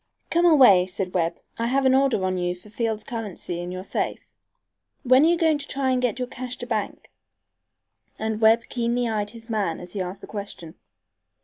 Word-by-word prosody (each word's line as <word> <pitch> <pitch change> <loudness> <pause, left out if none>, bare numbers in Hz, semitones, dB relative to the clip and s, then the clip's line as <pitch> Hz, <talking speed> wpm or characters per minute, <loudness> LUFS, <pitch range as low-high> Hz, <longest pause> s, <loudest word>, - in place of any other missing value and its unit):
"Come 345 +1 +4
away," 245 - +7
said 185 -1 -4
Webb. 170 -1 0 0.2
"I 230 - 0
have 270 +2 +1
an 260 - +5
order 265 -7 +2
on 185 -1 -1
you 175 0 -1
for 185 +4 -17
Field's 220 -1 -2
currency 205 -6 -5
in 175 +1 -5
your 185 0 -6
safe. - - -4 0.7
When 255 +1 +5
are - - +5
you 340 +1 +3
going 320 -3 +2
to 280 - -8
try 265 -1 0
to 255 - +1
get 245 -3 0
your 250 -1 -3
cash 255 0 -6
to - - -6
bank?" 220 -4 -4 1.1
And 220 0 -3
Webb 225 +1 +5
keenly 240 0 -1
eyed 210 -2 -1
his 230 +1 -12
man 205 -8 -1
as 180 0 -10
he 200 - -3
asked 185 +2 -5
the - - -8
question. 200 -6 -8
225 Hz, 205 wpm, -24 LUFS, 185-255 Hz, 1.1 s, away